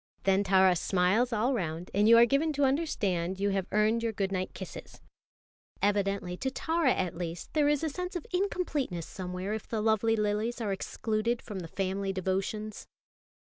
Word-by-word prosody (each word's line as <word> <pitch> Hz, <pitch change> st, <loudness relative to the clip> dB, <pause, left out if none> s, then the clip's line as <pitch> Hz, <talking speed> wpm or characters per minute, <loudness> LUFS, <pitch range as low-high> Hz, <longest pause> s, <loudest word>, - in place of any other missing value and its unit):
Then 195 Hz, +1 st, +3 dB
Tara 190 Hz, -1 st, +5 dB
smiles 190 Hz, +8 st, +2 dB
all 235 Hz, +4 st, +1 dB
round, 170 Hz, -5 st, -3 dB
and 205 Hz, +2 st, +4 dB
you 230 Hz, -, +9 dB
are 235 Hz, -, +8 dB
given 280 Hz, +6 st, +1 dB
to 285 Hz, 0 st, 0 dB
understand 200 Hz, -, 0 dB
you 200 Hz, 0 st, +1 dB
have 195 Hz, -2 st, -1 dB
earned 215 Hz, +2 st, +2 dB
your 230 Hz, -1 st, 0 dB
good 195 Hz, -2 st, -2 dB
night 185 Hz, -1 st, -2 dB
kisses. -, -, -9 dB, 0.8 s
Evidently 200 Hz, -3 st, 0 dB
to 265 Hz, -, -1 dB
Tara 320 Hz, +1 st, +1 dB
at 185 Hz, -6 st, -1 dB
least 170 Hz, -1 st, -6 dB
there 295 Hz, -2 st, +3 dB
is 295 Hz, +1 st, +1 dB
a 320 Hz, -, +1 dB
sense 360 Hz, +5 st, -5 dB
of 350 Hz, -, -4 dB
incompleteness 305 Hz, -, -1 dB
somewhere 185 Hz, +2 st, -5 dB
if 220 Hz, -, -5 dB
the 225 Hz, -, -2 dB
lovely 220 Hz, +1 st, +2 dB
lilies 210 Hz, +3 st, -1 dB
are 210 Hz, -4 st, -1 dB
excluded 220 Hz, +4 st, -1 dB
from 205 Hz, -4 st, -7 dB
the 170 Hz, -, -6 dB
family 195 Hz, +2 st, -2 dB
devotions. 195 Hz, +3 st, -3 dB
210 Hz, 180 wpm, -30 LUFS, 190-240 Hz, 0.8 s, you